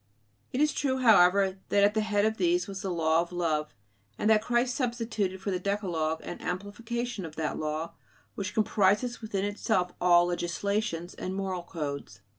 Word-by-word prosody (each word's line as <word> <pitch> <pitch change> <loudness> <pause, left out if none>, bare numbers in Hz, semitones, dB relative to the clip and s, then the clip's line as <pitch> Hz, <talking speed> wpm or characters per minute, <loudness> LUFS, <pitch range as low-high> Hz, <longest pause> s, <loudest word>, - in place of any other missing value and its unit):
It 255 - -2
is 300 -1 +3
true, 265 -2 0
however, 195 -5 +5
that 200 - +4
at 205 +1 +4
the 220 - +1
head 210 -1 +1
of 220 0 0
these 350 -3 +2
was 195 -1 -6
the 195 - -3
"law" 165 -2 +2
of 170 - -6
love; 155 -4 -1 0.4
and 215 - +2
that 215 -1 +5
Christ 245 +2 +1
substituted 230 -7 -2
for 195 +1 -3
the 180 - -1
Decalogue 175 -5 -1
an - - -7
amplification 225 +4 -4
of 160 -2 -8
that 160 -1 -2
law, 155 +2 -3 0.4
which 195 0 -5
comprises 215 +3 +2
within 200 -3 -2
itself 200 -3 0
all 175 -1 +6
legislations 175 +1 -2
and 185 +1 -5
moral 190 -2 -2
codes. 140 - -6
195 Hz, 175 wpm, -29 LUFS, 175-220 Hz, 0.4 s, all